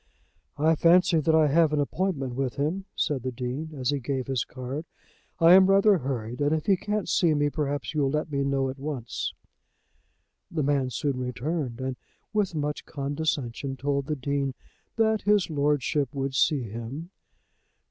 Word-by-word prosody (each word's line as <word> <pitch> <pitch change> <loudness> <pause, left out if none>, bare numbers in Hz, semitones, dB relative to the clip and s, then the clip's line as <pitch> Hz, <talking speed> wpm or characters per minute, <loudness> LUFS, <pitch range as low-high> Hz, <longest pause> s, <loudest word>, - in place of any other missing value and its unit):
"I 155 +3 +4
fancy 170 +1 +4
that 160 +1 +2
I 160 -1 +5
have 160 +1 +4
an 150 - +1
appointment 145 -3 -1
with 130 -1 -2
him," 165 +7 -1
said 145 -6 0
the 130 +1 -3
Dean, 125 +6 -4
as 130 +1 0
he 145 - -1
gave 130 0 -2
his 130 -5 0
card. 130 +5 -6 0.5
"I 165 +1 +7
am 190 0 +8
rather 195 0 +5
hurried, 125 -2 -4
and 145 +2 +3
if 155 - -3
he 195 - +4
can't 210 +2 -2
see 170 -6 +3
me 145 0 +1
perhaps 145 -4 -2
you'll 145 -3 +1
let 150 +2 -2
me 140 -1 0
know 135 -1 +1
at 135 - -12
once." 135 -5 -4 1.2
The 155 -3 -1
man 135 -2 +1
soon 140 0 -2
returned, 125 +1 -3
and 130 -1 -3 0.4
with 205 -5 0
much 150 -1 -2
condescension 140 -2 -3
told 140 +1 -1
the 150 - -1
Dean 140 -1 -2 0.4
that 220 -1 +2
his 205 -4 +2
lordship 145 -1 0
would 135 0 -2
see 135 +1 +2
him. 120 - -7
145 Hz, 170 wpm, -27 LUFS, 135-160 Hz, 1.2 s, am